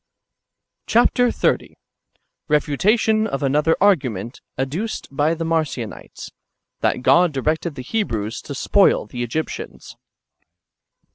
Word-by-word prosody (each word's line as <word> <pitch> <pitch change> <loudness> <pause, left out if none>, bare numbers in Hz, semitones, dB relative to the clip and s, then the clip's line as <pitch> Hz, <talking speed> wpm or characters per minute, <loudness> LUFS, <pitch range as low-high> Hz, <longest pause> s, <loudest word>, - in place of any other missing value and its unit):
Chap. 235 +2 +4
xxx. 245 -1 +1 0.4
— - - -48
Befutation 215 - +2
of 140 -8 -3
another 150 +4 +2
argument 130 - +1 0.2
adduced 155 - -3
hy 150 +4 +2
the 165 0 -4
Marcionitesy 155 -9 -3 0.5
that 125 - 0
God 175 +3 +5
directed 155 +3 -1
the 130 - -7
Ilehrews 115 - -2
to 140 - -6
spoil 200 +8 +3
the 120 - -7
Egyptians. 120 +7 -5
155 Hz, 110 wpm, -21 LUFS, 130-195 Hz, 0.5 s, God